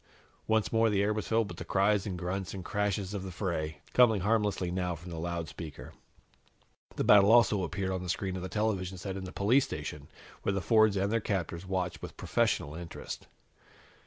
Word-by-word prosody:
Once 110 Hz, 0 st, +1 dB
more 115 Hz, 0 st, +4 dB
the 100 Hz, -1 st, +2 dB
air 105 Hz, +1 st, +2 dB
was 110 Hz, -, -3 dB
filled 115 Hz, -1 st, +2 dB
with -, -, -9 dB
the -, -, -4 dB
cries 100 Hz, +1 st, +2 dB
and 95 Hz, -3 st, -3 dB
grunts 90 Hz, +1 st, -3 dB
and 95 Hz, -2 st, -7 dB
crashes 100 Hz, -1 st, -1 dB
of 100 Hz, -, -3 dB
the 95 Hz, -, -6 dB
fray, 85 Hz, -4 st, -3 dB
coming 115 Hz, -5 st, +5 dB
harmlessly 105 Hz, -3 st, +1 dB
now 90 Hz, -1 st, -1 dB
from 85 Hz, +2 st, -10 dB
the 80 Hz, -, -5 dB
loudspeaker. 80 Hz, -3 st, -5 dB, 1.0 s
The -, -, 0 dB
battle 100 Hz, 0 st, +7 dB
also 115 Hz, -4 st, +5 dB
appeared 95 Hz, +3 st, -2 dB
on 95 Hz, -1 st, -2 dB
the 90 Hz, -, -6 dB
screen 95 Hz, +1 st, -2 dB
of 95 Hz, -, -4 dB
the 95 Hz, -, -5 dB
television 95 Hz, -2 st, -1 dB
set 95 Hz, +1 st, -5 dB
in 95 Hz, -1 st, -5 dB
the 90 Hz, -, -7 dB
police 115 Hz, +9 st, +3 dB
station, -, -, -6 dB, 0.3 s
where 100 Hz, -, 0 dB
the 100 Hz, -, 0 dB
Fords 110 Hz, 0 st, +4 dB
and 100 Hz, +2 st, 0 dB
their 115 Hz, -, +2 dB
captors 95 Hz, -3 st, -3 dB
watched 95 Hz, -2 st, -2 dB
with -, -, -8 dB
professional 70 Hz, -, 0 dB
interest. 85 Hz, +1 st, -7 dB
95 Hz, 200 wpm, -30 LUFS, 90-105 Hz, 1.0 s, battle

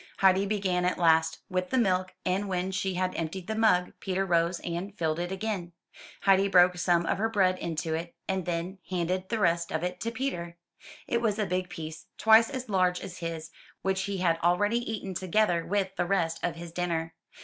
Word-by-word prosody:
Heidi 190 Hz, +1 st, +4 dB
began 190 Hz, -3 st, 0 dB
at 180 Hz, -, +1 dB
last, 160 Hz, -1 st, +3 dB
with 185 Hz, 0 st, -2 dB
the 260 Hz, -, +1 dB
milk; 185 Hz, -5 st, +1 dB
and 195 Hz, +2 st, 0 dB
when 185 Hz, 0 st, -1 dB
she 190 Hz, 0 st, -1 dB
had 185 Hz, 0 st, 0 dB
emptied 170 Hz, +3 st, -4 dB
the 220 Hz, -, -3 dB
mug, 215 Hz, -5 st, +3 dB
Peter 190 Hz, 0 st, -1 dB
rose 170 Hz, -1 st, +1 dB
and 180 Hz, +4 st, -5 dB
filled 160 Hz, -1 st, 0 dB
it 175 Hz, +1 st, -3 dB
again. 190 Hz, -3 st, -3 dB, 0.5 s
Heidi 195 Hz, 0 st, +4 dB
broke 180 Hz, -2 st, +5 dB
some 175 Hz, -1 st, +2 dB
of 175 Hz, -, 0 dB
her 225 Hz, +2 st, +1 dB
bread 185 Hz, -4 st, +2 dB
into 165 Hz, -1 st, -2 dB
it, 170 Hz, +1 st, -4 dB
and 190 Hz, -2 st, -2 dB
then 175 Hz, +3 st, -3 dB
handed 185 Hz, +1 st, -1 dB
the 230 Hz, -, 0 dB
rest 170 Hz, -4 st, +1 dB
of 160 Hz, +1 st, -1 dB
it 180 Hz, 0 st, -3 dB
to 230 Hz, -, -2 dB
Peter. 205 Hz, -10 st, -4 dB, 0.5 s
It 235 Hz, -, 0 dB
was 215 Hz, -3 st, +1 dB
a 215 Hz, -, 0 dB
big 180 Hz, 0 st, -2 dB
piece, 160 Hz, -1 st, -7 dB
twice 220 Hz, +1 st, +6 dB
as 260 Hz, -2 st, -5 dB
large 185 Hz, -3 st, +2 dB
as 180 Hz, -, -8 dB
his, 165 Hz, -1 st, -5 dB, 0.3 s
which 190 Hz, 0 st, +1 dB
he 200 Hz, 0 st, -3 dB
had 170 Hz, -3 st, +1 dB
already 205 Hz, +7 st, +2 dB
eaten, 195 Hz, -3 st, -4 dB
together 185 Hz, -1 st, +1 dB
with 195 Hz, 0 st, -1 dB
the 175 Hz, -, +1 dB
rest 170 Hz, -4 st, 0 dB
of 175 Hz, -2 st, -1 dB
his 170 Hz, 0 st, -8 dB
dinner. 165 Hz, -2 st, -2 dB
185 Hz, 205 wpm, -28 LUFS, 170-195 Hz, 0.5 s, twice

